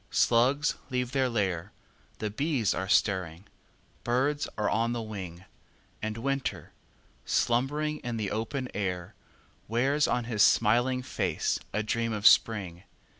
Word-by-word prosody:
Slugs 130 +5 +2
leave 125 -1 -1
their 130 -1 +1
lair— 95 -7 -1 0.5
The 105 -1 -3
bees 135 - 0
are 95 0 -3
stirring—birds 105 - -1
are 105 -1 0
on 115 +2 +1
the 120 - -3
wing— 95 -4 -7 0.6
And 110 0 -3
Winter, 135 +3 -3 0.5
slumbering 145 - 0
in 120 -2 -4
the 105 -3 -2
open 125 +5 -3
air, 90 -4 -3 0.5
Wears 135 +7 +2
on 125 - 0
his 115 -3 -1
smiling 120 +5 +4
face - - -1
a 110 - -1
dream 115 +1 -1
of 105 0 -4
Spring! 95 -8 +4
115 Hz, 125 wpm, -28 LUFS, 105-130 Hz, 0.6 s, smiling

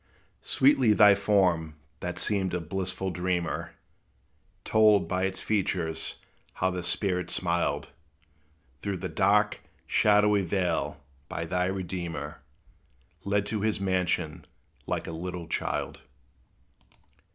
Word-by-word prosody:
Sweetly 130 -5 +4
thy 105 -1 +7
form, 95 -6 +2 0.2
that 90 0 -4
seemed 95 -4 0
a - - 0
blissful 95 +2 -3
dreamer, 90 -1 -2 0.9
Told, 105 -2 +4
by 95 0 0
its 95 -1 -3
features, 90 -6 -1 0.4
how 95 0 0
the 90 0 -3
spirit 90 0 -1
smiled, 85 -1 -1 0.9
Through 100 -2 -2
the - - -4
dark, 105 +2 +2 0.3
shadowy 105 -1 +4
vale, 85 -5 -1 0.3
by 85 - -3
thy 90 +2 0
Redeemer 90 -3 -4 0.8
Led 100 0 +1
to 105 0 -2
his 110 -1 0
mansion, 90 -4 -1 0.4
like - - -2
a - - -5
little 85 +1 -5
child. 80 - -3
95 Hz, 110 wpm, -28 LUFS, 85-100 Hz, 0.9 s, thy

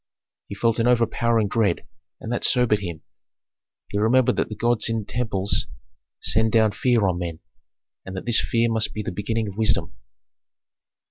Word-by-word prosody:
He 100 - -7
felt 115 +2 +1
an 115 - +2
overpowering 115 -2 +2
dread, 100 -3 0 0.3
and 110 - -6
that 120 - -2
sobered 125 -5 +3
him. 85 -5 -6 0.9
He 100 - -1
remembered 120 +4 +3
that - - 0
the 110 - -6
gods 120 +1 +1
in 110 -2 -2
temples 105 -5 -1 0.5
send 110 0 +1
down 110 -1 +4
fear 115 0 +2
on 90 -2 -1
men, 85 -2 -4 0.7
and 95 0 -7
that - - -6
this 120 -1 +3
fear 115 0 +1
must 115 -1 0
be 105 - -3
the - - -4
beginning 105 +4 -2
of 100 0 -8
wisdom. 110 -1 +1
110 Hz, 170 wpm, -23 LUFS, 100-115 Hz, 0.9 s, down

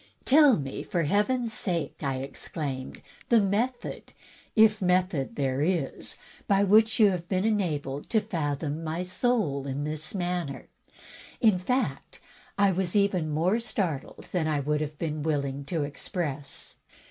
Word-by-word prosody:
"Tell 285 -2 +6
me, 135 -3 -4
for 170 -2 -1
Heaven's 220 - +1
sake," 170 -8 -2
I 135 -3 -1
exclaimed, 135 -1 -6 0.3
"the 235 - +6
method 225 +5 -2 0.2
— - - -28
if 215 -1 0
method 180 -6 +1
there 135 -1 0
is 160 -4 -2
— - - -25
^by 200 0 +4
which 220 +3 +5
you 210 -3 +7
have 175 -2 -4
been 185 +1 +1
enabled 150 -10 -1
to 220 - +3
fathom 155 -6 -3
my 165 +3 -2
soul 180 - 0
in 140 +2 -3
this 155 +3 -4
matter." 175 -6 -3 0.7
In 215 -6 +4
fact, 250 +8 -2 0.4
I 200 -1 +4
was 185 +1 -2
even 195 -6 +2
more 170 +9 +1
startled 180 - -3
than 170 -4 0
I 150 -2 +1
would 150 +2 0
have 150 0 -4
been 155 -2 -3
willing 140 -2 -1
to 160 -1 -1
express. 145 -1 -5
170 Hz, 150 wpm, -27 LUFS, 145-200 Hz, 0.7 s, you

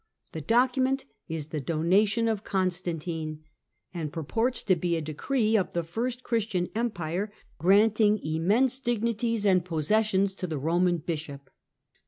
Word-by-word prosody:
The 160 - -5
document 255 - +2 0.2
is 160 -2 -5
the 155 -1 -3
Donation 195 - +2
of 215 -2 -1
Gonstantine, 170 -4 -2 0.5
and 160 -4 -4
purports 225 - -1
to 185 - +3
be 175 0 -1
a - - 0
decree 215 - 0
of 195 -4 +1
the 170 - 0
first 240 +9 -3
Christian 215 -6 -1
Empire, 200 -4 -2 0.3
granting 210 +3 +4
immense 205 +12 +2
dignities 230 -2 -1
and 185 -3 +4
possessions 190 +4 +1
to 185 -1 -5
the 160 -3 -3
Roman 175 +5 +2
bishop. 150 -4 -6
190 Hz, 135 wpm, -27 LUFS, 165-225 Hz, 0.5 s, granting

